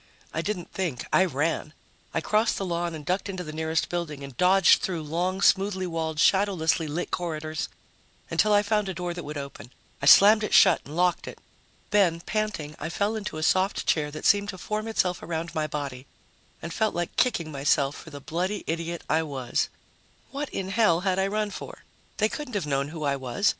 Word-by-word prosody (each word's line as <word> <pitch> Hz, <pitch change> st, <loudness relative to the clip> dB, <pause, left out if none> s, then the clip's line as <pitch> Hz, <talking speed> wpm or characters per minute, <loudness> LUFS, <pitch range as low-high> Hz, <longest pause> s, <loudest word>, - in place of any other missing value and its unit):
I -, -, -1 dB
didn't 200 Hz, -5 st, -4 dB
think. 170 Hz, -10 st, -3 dB
I 185 Hz, -, +5 dB
ran. 155 Hz, -1 st, -1 dB, 0.4 s
I 165 Hz, -, -1 dB
crossed 215 Hz, +6 st, +1 dB
the 195 Hz, -, -2 dB
lawn 170 Hz, -1 st, -2 dB
and 150 Hz, -2 st, -9 dB
ducked 185 Hz, +2 st, -1 dB
into 185 Hz, -2 st, -4 dB
the 155 Hz, -2 st, -7 dB
nearest 160 Hz, +1 st, -1 dB
building 160 Hz, -5 st, -4 dB
and 140 Hz, -2 st, -9 dB
dodged 185 Hz, +5 st, +5 dB
through 170 Hz, -4 st, -2 dB
long, 180 Hz, +5 st, -1 dB
smoothly 190 Hz, -1 st, +3 dB
walled, 160 Hz, -2 st, -3 dB
shadowlessly 175 Hz, -3 st, +2 dB
lit 160 Hz, +4 st, -3 dB
corridors 155 Hz, -3 st, -3 dB, 0.6 s
until 215 Hz, -, +2 dB
I 205 Hz, 0 st, +5 dB
found 210 Hz, -1 st, 0 dB
a 190 Hz, -, -4 dB
door 175 Hz, 0 st, -3 dB
that 175 Hz, 0 st, -6 dB
would 150 Hz, +1 st, -6 dB
open. 140 Hz, -5 st, -8 dB, 0.3 s
I 140 Hz, -, 0 dB
slammed 210 Hz, +7 st, +8 dB
it 210 Hz, -, +1 dB
shut 185 Hz, -4 st, +6 dB
and 150 Hz, -, -9 dB
locked 180 Hz, 0 st, +1 dB
it. -, -, -7 dB, 0.5 s
Then, 185 Hz, -5 st, +3 dB
panting, 190 Hz, -6 st, -3 dB
I -, -, -4 dB
fell 205 Hz, +5 st, -1 dB
into 210 Hz, -7 st, -5 dB
a 155 Hz, -, -3 dB
soft 190 Hz, +4 st, +2 dB
chair 150 Hz, -2 st, +1 dB
that 155 Hz, +1 st, -8 dB
seemed 205 Hz, 0 st, +4 dB
to 190 Hz, -, -5 dB
form 215 Hz, +4 st, -3 dB
itself 185 Hz, -5 st, 0 dB
around 165 Hz, 0 st, -4 dB
my 155 Hz, -1 st, -1 dB
body, 140 Hz, -3 st, -5 dB, 0.6 s
and 170 Hz, +1 st, -5 dB
felt 220 Hz, +2 st, 0 dB
like 175 Hz, 0 st, -3 dB
kicking 170 Hz, -11 st, +1 dB
myself 140 Hz, 0 st, +1 dB
for -, -, -11 dB
the 145 Hz, -2 st, -9 dB
bloody 180 Hz, +8 st, -3 dB
idiot 170 Hz, +1 st, -3 dB
I 160 Hz, -, +2 dB
was. 135 Hz, -6 st, -2 dB, 0.6 s
What 285 Hz, +1 st, -4 dB
in 190 Hz, -1 st, -4 dB
hell 200 Hz, -5 st, +3 dB
had 190 Hz, -1 st, 0 dB
I 190 Hz, -, +2 dB
run 210 Hz, +1 st, -1 dB
for? -, -, -9 dB, 0.3 s
They 215 Hz, -, +3 dB
couldn't 255 Hz, -1 st, -6 dB
have 195 Hz, -6 st, -1 dB
known 140 Hz, -1 st, 0 dB
who 155 Hz, +1 st, -7 dB
I 140 Hz, -1 st, +1 dB
was. 130 Hz, -, 0 dB
175 Hz, 205 wpm, -26 LUFS, 155-195 Hz, 0.6 s, slammed